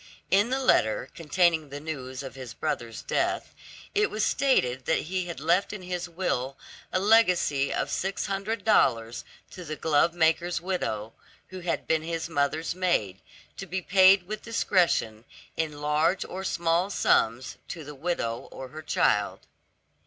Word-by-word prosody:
In 205 +4 +4
the 260 - +1
letter, - - +2
containing 165 -2 +1
the 140 +1 -6
news 140 -4 -6
of 135 - -7
his 130 -4 -9
brother's 115 -1 -3
death, - - -1 0.4
it 420 +1 +2
was 215 0 0
stated 130 - +1
that 160 - +1
he 185 +2 -3
had 170 -6 -6
left 175 +7 +1
in 200 -3 -7
his 180 -1 -4
will 135 -7 -2 0.3
a 185 - +1
legacy 180 -10 +3
of - - -2
six 195 +1 -2
hundred 200 +2 -3
dollars 120 - +2 0.3
to 180 - -9
the 155 -2 -5
glovemaker's 165 +3 +2
widow, 115 - -3 0.4
who 185 - -8
had 175 -1 -2
been 160 -1 +2
his 165 +1 -4
mother's 155 +1 0
maid, 170 - 0 0.4
to 195 - -7
be 185 +1 -2
paid 190 +1 +6
with 210 +4 -6
discretion, 175 - +1 0.3
in 150 -2 -3
large 155 +5 +1
or 190 +1 -6
small 170 +1 +1
sums 120 - +1
to 165 - -7
the 150 +1 -9
widow 135 -6 -3
or 130 - -8
her 155 +4 -8
child. 105 -9 +1
165 Hz, 155 wpm, -27 LUFS, 140-185 Hz, 0.4 s, paid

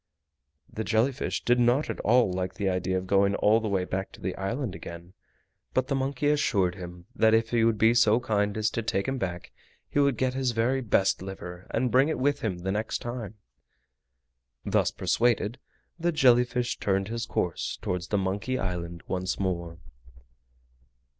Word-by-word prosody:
The 110 - -3
jelly 110 +4 +2
fish 130 - -3
did 120 0 +3
not 120 +5 +3
at - - -4
all 115 -4 +3
like 90 0 -3
the 100 -1 -2
idea 95 0 0
of 95 - -4
going 100 +1 +3
all 110 +2 +4
the 110 - -3
way 95 -2 0
back 95 +1 -3
to - - -13
the 95 - -3
island 115 +3 -3
again; 85 -1 -9 0.6
but 130 - +2
the - - +1
monkey 135 +1 0
assured 100 -11 +1
him 90 -1 -9
that 110 0 +4
if 115 0 +1
he 120 -1 +3
would 115 -1 +3
be 110 +2 +5
so 115 -1 +4
kind 105 -3 0
as 110 0 +1
to 115 - -2
take 100 -3 -1
him 130 0 -2
back 90 -4 -4 0.4
he - - -1
would 140 -4 +3
get 130 +1 0
his 130 -2 0
very 125 +4 +1
best 95 -6 +2
liver, 90 -2 -8
and 125 -2 0
bring 135 +4 +4
it - - -1
with 145 +2 +1
him 100 -5 -2
the 95 +2 -3
next 105 +2 -1
time. 120 -4 -6 1.3
Thus - - +2
persuaded, 120 0 0 0.4
the 175 +1 +1
jelly 125 -5 +5
fish 125 0 -2
turned 95 0 0
his 115 0 -3
course 90 -6 -2
towards 90 -1 -3
the 105 - 0
Monkey 100 +7 -1
Island 85 -4 -4
once 95 0 -2
more. 85 -3 -2
110 Hz, 185 wpm, -27 LUFS, 95-125 Hz, 1.3 s, be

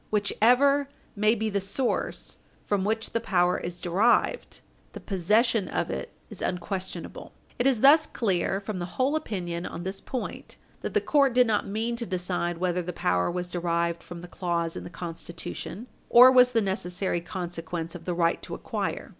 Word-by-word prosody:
Whichever 250 +7 +3 0.3
may 215 +2 +3
be 220 0 -2
the 200 - +1
source 235 +6 -2 0.3
from 200 -2 0
which 220 +2 -1
the 230 - 0
power 180 -5 +2
is 175 0 -6
derived, 210 - +1 0.3
the - - -7
possession 210 +2 +2
of - - -2
it 65 0 -5 0.2
is - - -9
unquestionable." 185 +1 -4 0.3
It 245 - +3
is 250 -5 +2
thus 305 +3 +7
clear 195 -3 0
from 200 -1 -5
the 175 0 -7
whole 265 +4 +2
opinion 180 - -3
on 170 - -7
this 190 +1 -5
point 255 -2 -6 0.3
that - - -5
the - - +4
court 275 -4 +3
did 250 0 +6
not 220 -3 0
mean 225 +4 -2
to 235 -1 -5
decide 180 -2 -2
whether 180 0 0
the 180 +1 -4
power 90 - +1
was 180 0 -3
derived 170 -1 -1
from 175 -1 -9
the 175 - -9
clause 170 -2 -2
in - - -6
the - - -7
Constitution 170 +5 -7 0.2
or 250 +2 +9
was 250 -1 +6
the 225 - +3
necessary 190 -2 -1
consequence 170 -2 -5
of 175 - -9
the 180 - -2
right 170 -1 +1
to - - -6
acquire. - - -4
190 Hz, 180 wpm, -27 LUFS, 175-230 Hz, 0.3 s, or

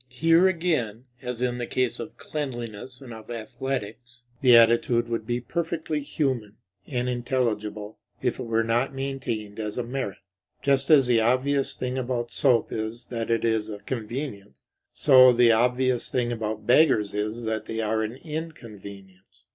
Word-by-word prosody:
Here 165 +8 +4
again, 155 - -1 0.2
as 125 -1 -4
in 125 -1 -1
the 120 - -3
case 130 -2 -1
of 115 - -8
cleanliness 125 -4 -6
and 125 -3 -9
of 110 0 -12
athletics, 120 0 -5 0.2
the 125 -3 +7
attitude 115 +1 +4
would 115 -2 -3
be 120 0 0
perfectly 160 +3 -3
human 130 -7 -2 0.3
and 125 -2 -2
intelligible 110 -4 -2 0.2
if - - -1
it - - -4
were 115 0 +1
not 120 +4 0
maintained 120 -6 -4
as 105 -1 -4
a 125 - -1
merit. 125 -4 -4 0.5
Just 140 -1 +2
as 145 -4 +7
the 120 -2 +3
obvious 130 +4 +1
thing 130 +1 -3
about 120 -2 -3
soap 120 -3 +2
is 110 +2 -4
that 115 -2 -3
it 115 0 +1
is 110 -1 0
a 105 - -5
convenience, 110 -1 -6 0.3
so 130 -3 +7
the 120 -1 +5
obvious 125 +2 +2
thing 120 -1 0
about 110 -2 -4
beggars 120 -6 +4
is 105 +3 -3
that 110 -1 -3
they 115 - -4
are 110 0 0
an 110 +2 -3
inconvenience. 105 - -9
120 Hz, 160 wpm, -25 LUFS, 110-130 Hz, 0.5 s, the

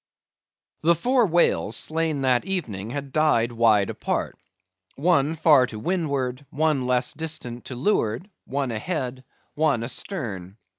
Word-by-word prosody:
The 170 +2 +4
four 245 - +2
whales 175 0 +2
slain 160 -2 -1
that 130 -2 +2
evening 115 - -2
had 140 +2 -5
died 150 -7 +3
wide 110 -4 +3
apart; - - -3 0.6
one, 150 0 +2
far 145 -5 +5
to 110 - -8
windward; 140 - -2
one, 150 -4 0
less 125 0 +1
distant, 150 -6 -5
to 130 - -6
leeward; 125 - 0 0.2
one 135 -1 -2
ahead; 130 +1 -3 0.3
one 145 -6 +1
astern. 115 - -5
140 Hz, 130 wpm, -24 LUFS, 120-160 Hz, 0.6 s, far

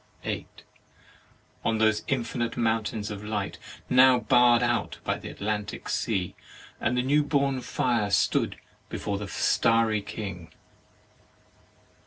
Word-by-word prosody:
8. - - -5 1.0
On 115 0 +1
those 110 -1 +3
infinite 120 -2 -2
mountains 110 -2 -1
of 105 0 -6
light 105 -2 -3 0.3
now 130 0 +6
barr'd 120 +1 +4
out 120 0 0
by - - 0
the - - -8
Atlantic 105 0 -4
43 - - -6
THE 105 -4 0
MARRIAGE 90 - -6
OF - - -8
sea, 125 - +2
the - - -4
new 150 +2 +4
born 140 -3 +1
fire 120 -5 0
stood 100 - +2 0.3
before 100 -1 -3
the 105 - -5
starry 115 +2 +2
king. 100 -6 -7
110 Hz, 135 wpm, -27 LUFS, 105-125 Hz, 1.0 s, now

